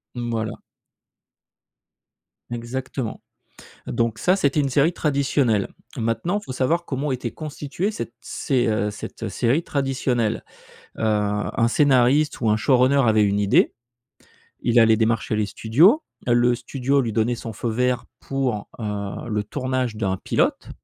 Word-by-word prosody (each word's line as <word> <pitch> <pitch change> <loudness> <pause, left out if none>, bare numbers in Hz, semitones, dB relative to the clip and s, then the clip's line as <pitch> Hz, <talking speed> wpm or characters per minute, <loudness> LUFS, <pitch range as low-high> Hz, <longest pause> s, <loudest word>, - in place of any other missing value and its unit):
Mmh, 120 -1 -3
voilà. 110 -1 -2 2.0
Exactement. 120 0 -4 0.7
Donc 115 -1 -1
ça, 185 - +3
c'était 150 -5 +1
une 140 -1 0
série 145 +6 +3
traditionnelle. 140 - +1 0.3
Maintenant, 115 - -1
faut 165 - -7
savoir 160 +7 0
comment 140 +1 -2
était 125 -2 -3
constituée 155 - -4
cette 115 - -6
sé 130 -3 -1
heu, 105 -2 +1
cette, 105 - -8
heu, - - -2
série 130 +8 +1
traditionnelle. 130 -6 -1 0.6
Heu, - - -4
un 105 +2 +1
scénariste, 140 +2 +3
ou 115 - +1
un 105 - +4
showrunner 130 +4 +3
avait 110 -1 +4
une 100 0 +1
idée. 100 0 +3 0.9
Il 120 0 +3
allait 110 -1 +5
démarcher 110 -1 +1
les 105 -1 0
studios. 160 - +4 0.2
Le 120 0 +4
studio 135 +3 0
lui 115 - -2
donnait 115 +3 +1
son 115 -1 -7
feu 115 +3 -3
vert 125 +2 0
pour, 130 -6 -2
heu, 105 +1 -4
le 105 -1 -1
tournage 130 -1 -2
d'un 95 -3 -1
pilote, - - 0
120 Hz, 140 wpm, -23 LUFS, 110-135 Hz, 2.0 s, allait